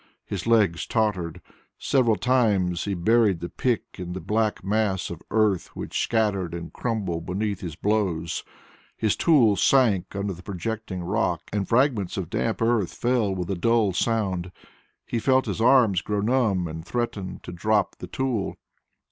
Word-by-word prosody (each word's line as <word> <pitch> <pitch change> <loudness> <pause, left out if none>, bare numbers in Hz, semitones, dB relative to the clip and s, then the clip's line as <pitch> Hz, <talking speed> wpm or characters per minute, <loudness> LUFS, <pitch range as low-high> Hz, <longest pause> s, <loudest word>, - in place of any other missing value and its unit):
His 100 +1 -5
legs 105 -8 +3
tottered. 90 -7 -1 0.3
Several 120 -5 +2
times 105 -9 +1
he 100 - -1
buried 105 0 +3
the 85 +1 -5
pick 125 -4 0 0.2
in 90 -1 -5
the 95 - -4
black 105 +1 -1
mass 100 -2 0
of 85 - -7
earth 105 -4 +2
which - - -3
scattered 100 -7 0
and 85 -1 -7
crumbled 95 -9 -3
beneath 100 +1 -2
his 85 -5 -5
blows; 95 -5 -1 0.5
his 110 -2 +1
tool 125 -11 +4
sank 105 -5 +3
under 100 0 -2
the 90 - -11
projecting 100 0 -4
rock 90 -3 0
and 100 -2 -1
fragments 115 -7 +2
of 90 -3 -4
damp 115 0 -1
earth 115 -6 +1
fell 120 -5 +1
with 90 0 -3
a - - 0
dull 110 +1 +2
sound. 95 -4 -1 0.5
He 115 - -2
felt 130 +2 +3
his 105 0 -3
arms 115 -6 +5
grow 105 0 -2
numb 105 -6 +1
and 80 0 -7
threaten 105 -3 -3
to - - -7
drop 105 +4 0
the - - -8
tool. 125 -7 -2
105 Hz, 160 wpm, -25 LUFS, 90-115 Hz, 0.5 s, arms